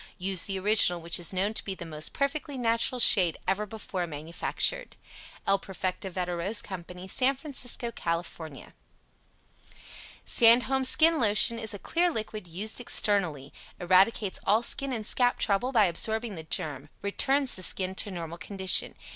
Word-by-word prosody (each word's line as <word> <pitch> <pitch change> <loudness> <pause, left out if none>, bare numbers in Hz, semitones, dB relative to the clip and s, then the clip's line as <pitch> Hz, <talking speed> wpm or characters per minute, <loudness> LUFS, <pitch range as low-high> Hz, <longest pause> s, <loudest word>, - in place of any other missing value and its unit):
Use 185 -1 -1
the 195 -1 -4
original 190 -3 +3
which 170 +1 -1
is 170 - -4
known 195 +3 -1
to - - -2
be 195 - -5
the 175 - -9
most 155 -1 -4
perfectly 280 0 -3
natural 230 +1 0
shade 185 -8 +5
ever 200 +3 -1
before 195 -4 -5
manufactured. 165 - -2 0.5
El 195 0 +2
Perfecto 190 0 -5
Veda 180 -1 -4
Rose 195 +6 0
CO. 190 -3 -7 0.2
SAN 260 +7 +1
FRANCISCO, 255 -4 -3
CAL. 170 -5 -3 2.0
SANDHOLM'S 250 +3 +4
SKIN 325 0 +4
LOTION 225 +1 +3
is 220 -2 -4
a - - -6
clear 345 - 0
liquid 215 - -6
used 205 +8 -3
externally. 180 - 0 0.3
Eradicates 190 +3 +2
all 215 +4 +3
skin 275 +3 -1
and 225 -4 -4
scalp 245 +2 +2
trouble 215 +5 -1
by 225 -5 +4
absorbing 220 +6 +1
the 165 - -7
germ 145 -3 -4
returns 270 +7 +1
the 185 - -8
skin 185 +1 +1
to 200 - -3
normal 170 -2 -7
condition. 190 -1 +2
200 Hz, 155 wpm, -27 LUFS, 180-235 Hz, 2.0 s, shade